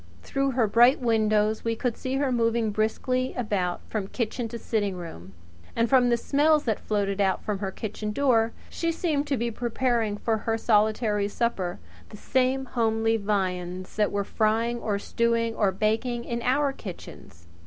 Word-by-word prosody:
Through 275 0 -1
her 240 -2 +3
bright 235 +5 +5
windows 215 -3 +2
we 230 0 0
could 235 0 -1
see 260 0 -3
her 275 -1 +1
moving 230 -2 +1
briskly 255 +5 -1
about 200 -7 -1
from 210 -3 -3
kitchen 235 +2 -3
to 235 +1 -6
sitting 205 -4 -1
room; 95 - -9 0.4
and 230 0 +2
from 250 0 +4
the 235 - +3
smells 295 +5 +3
that 220 -4 -1
floated 200 -1 -1
out 190 -2 +1
from 205 -2 -2
her 195 -1 -2
kitchen 210 +1 -5
door, 230 -2 +2 0.2
she 335 0 -2
seemed 310 -4 -1
to 280 -2 0
be 235 +1 -1
preparing 235 -2 0
for 225 +1 0
her 225 +1 -1
solitary 215 -1 +2
supper 200 -5 -2 0.3
the 210 - -10
same 260 +3 +1
homely 225 -2 +1
viands 185 -3 -2
that 210 -1 +1
were 200 0 0
frying 225 +3 0
or 210 -3 -1
stewing 230 +2 0
or 205 -3 +2
baking 225 +5 -1
in 235 0 -3
our 275 +3 +1
kitchens. 170 - -10
225 Hz, 170 wpm, -26 LUFS, 210-245 Hz, 0.4 s, bright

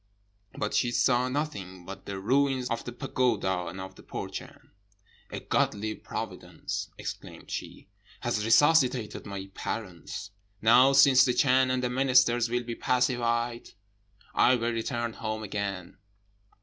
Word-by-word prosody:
But 105 - -2
she 120 - +2
saw 125 +1 +2
nothing 100 - -4
but 100 +2 -9
the 100 -1 -4
ruins 130 +4 +1
of 115 - -2
the 120 - -6
pagoda 115 -8 -1
and 95 - -7
of 95 0 -7
the - - -15
Burchan. - - -8 0.6
'A - - -5
godly 110 +1 0
providence,' - - -6
exclaimed - - -8
she, - - -6 0.3
'has 105 - -1
resuscitated 125 -2 +3
my 95 -1 -7
parents. 90 -7 -6 0.3
Now 125 +5 +6
since 135 -1 +7
the 125 -2 +1
Chan 130 -1 +4
and 130 0 0
the 125 - 0
ministers 125 -2 +3
will 120 +1 -1
be 120 0 -5
pacified, 120 -1 0 0.6
I 130 - +5
will 120 -1 -1
return 120 0 -2
home 110 0 -4
again.' 100 -3 -4
120 Hz, 135 wpm, -28 LUFS, 105-130 Hz, 0.6 s, since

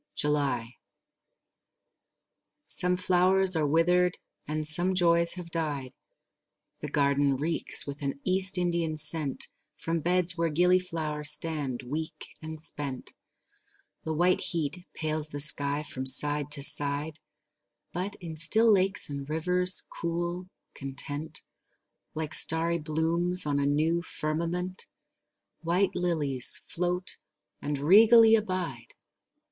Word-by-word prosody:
July 140 -5 -3 1.9
Some 180 0 +3
flowers 185 +1 +1
are 155 -2 -1
withered 180 +3 0 0.3
and 155 0 -4
some 175 +4 +5
joys 170 -1 +3
have 175 -2 -11
died; 145 -6 -5 0.9
The - - -8
garden 140 -1 -1
reeks 155 +5 +4
with 140 0 -9
an 140 -1 -4
East 190 0 +3
Indian 170 -3 -3
scent 150 -2 0 0.3
From 165 0 -4
beds 180 +2 +2
where 165 -1 -2
gillyflowers 165 -3 +1
stand 150 -5 -5
weak 155 +5 -7
and 160 0 -10
spent; 145 -4 -8 0.9
The 160 - -5
white 180 +3 0
heat 170 +2 -4
pales 155 -1 -3
the 145 - -8
skies 145 0 +6
from 130 0 -5
side 145 +2 +5
to 140 -2 +1
side; 145 +2 0 0.7
But 190 +4 -6
in 165 -3 -11
still 220 +8 +3
lakes 195 0 +1
and 140 -1 -9
rivers, 180 +4 0 0.2
cool, 175 +2 -5 0.3
content, 145 +3 -7 0.7
Like 155 0 -6
starry 165 +2 +6
blooms 165 +3 -1
on 145 -1 -2
a 140 - -2
new 160 +4 -1
firmament, 170 +3 -5 0.7
White 180 +4 -2
lilies 150 -8 -1
float 180 +1 -3 0.4
and 145 0 -5
regally 220 +9 +4
abide. 185 - -4
160 Hz, 115 wpm, -25 LUFS, 145-180 Hz, 1.9 s, skies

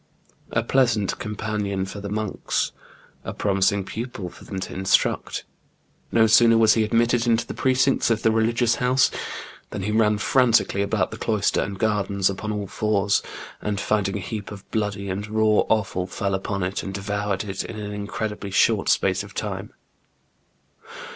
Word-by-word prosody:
A 115 - 0
pleasant 115 -5 +1
companion 105 -2 -2
for 100 +2 -7
the 100 - -5
monks! 105 0 -2 0.5
a - - -6
promising 100 0 +1
pupil 110 -3 -5
for - - -15
them 95 - -5
to - - -5
instruct! 95 +1 +1 0.7
No 110 -1 +5
sooner 115 +1 +6
was 110 -1 +6
he 110 - +2
admitted 115 +2 +2
into 115 0 +2
the - - -6
precincts 130 0 +2
of 115 -1 0
the 110 - +4
religious 115 +1 +2
house, 125 +1 +3 0.6
than 100 - -5
he 105 - -1
ran 105 -1 +3
frantically 115 -3 +3
about 100 -1 0
the 110 - -6
cloister 105 -3 +1
and 100 -1 -4
gardens 100 -2 +1
upon 105 +3 -4
all 105 -1 -3
fours, 100 0 +1 0.4
and 105 -1 -2
finding 105 -1 0
a - - -5
heap 105 +2 -5
of 105 -2 -10
bloody 105 -2 -2
and 100 +2 -3
raw 110 0 +3
offal, 95 -4 0
fell 100 +1 -2
upon 95 0 -2
it 90 +2 -2
and 95 -1 -6
devoured 100 0 -2
it 95 -2 -4
in 110 - -7
an 105 -1 -5
incredibly 105 0 -4
short - - +3
space - - +2
of - - -11
time. - - -4
105 Hz, 165 wpm, -24 LUFS, 100-110 Hz, 0.7 s, sooner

